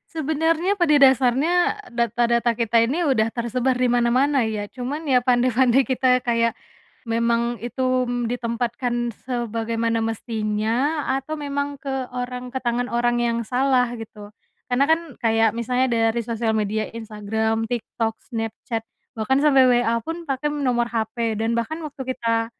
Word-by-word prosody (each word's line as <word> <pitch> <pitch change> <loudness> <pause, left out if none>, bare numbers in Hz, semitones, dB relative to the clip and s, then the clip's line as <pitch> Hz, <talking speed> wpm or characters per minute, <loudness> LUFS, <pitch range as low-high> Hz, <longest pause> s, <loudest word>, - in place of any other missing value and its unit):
Sebenarnya, 320 +4 +1
pada 345 -7 +3
dasarnya 275 - +4
e - - -16
data-data 235 0 +1
kita 230 0 +3
ini 285 +10 +1
udah 225 -6 +2
tersebar 245 +2 -1
di 255 - +2
mana-mana, 250 +3 +2
ya. 215 -2 -2
Cuman 265 +8 -5
ya, 255 -4 +3
pandai-pandai 250 +1 +3
kita 255 -1 +3
kayak 230 -1 +1 0.5
memang 235 +1 0
itu, 240 +4 -5 0.2
mmm, 245 -1 -2
ditempatkan 240 0 -2 0.2
sebagaimana 230 -2 -1
mestinya 225 +5 -1 0.2
atau 270 +4 -6
memang 285 -1 -3
ke 270 -2 -4
orang 250 0 -5
ke - - 0
tangan 240 0 0
orang 240 0 +1
yang 235 -1 0
salah, 250 +1 +1
gitu. 210 -2 -10 0.4
Karena 250 +3 +3
kan, 320 +2 +3 0.2
kayak 225 -1 +3
misalnya 250 +2 0
dari 230 0 +1
sosial 225 -1 -1
media 215 0 -1
Instagram, 220 0 -2
TikTok, 225 -1 -2 0.2
Snapchat, 225 0 -4 0.3
bahkan 265 +6 +1
sampai 275 -3 +6
WA 240 -2 +3
pun 330 +1 -4
pakai 295 -1 -2
nomor 250 -5 +1
HP. 225 0 -2
Dan 225 +2 0
bahkan 315 +8 -3
waktu 270 -4 -5
kita 230 -1 0
240 Hz, 145 wpm, -23 LUFS, 230-265 Hz, 0.5 s, sampai